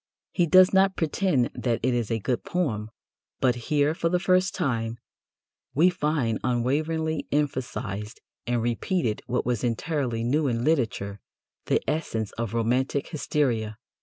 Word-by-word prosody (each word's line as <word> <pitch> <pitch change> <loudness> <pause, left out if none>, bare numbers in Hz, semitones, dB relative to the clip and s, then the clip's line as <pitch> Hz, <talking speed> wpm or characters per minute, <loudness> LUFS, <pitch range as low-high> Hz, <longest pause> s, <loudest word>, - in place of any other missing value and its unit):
He 175 -2 +2
does 185 +3 +7
not 190 0 +4
pretend 160 -5 +1
that 120 -3 -1
it 130 +1 +2
is 120 -3 -1
a 115 - +1
good 120 +3 -2
poem, 115 -12 -1 0.5
but 130 -2 +3 0.2
"here, 150 0 +3
for 165 0 0
the 180 - +2
first 185 +1 +2
time, 115 -8 -1 0.8
we 170 +6 +5
find 150 -9 0
unwaveringly 155 +6 0
emphasized 120 -7 -2 0.3
and 120 -1 0
repeated 120 - -1
what 125 - -1
was 120 -4 -1
entirely 120 -1 -1
new 145 +5 +1
in 120 -2 0
literature, 110 -9 0 0.5
the - - +1
essence 115 -9 -2
of 115 -1 -4
romantic 125 +4 0
hysteria." 120 -9 -1
130 Hz, 140 wpm, -26 LUFS, 115-160 Hz, 0.8 s, does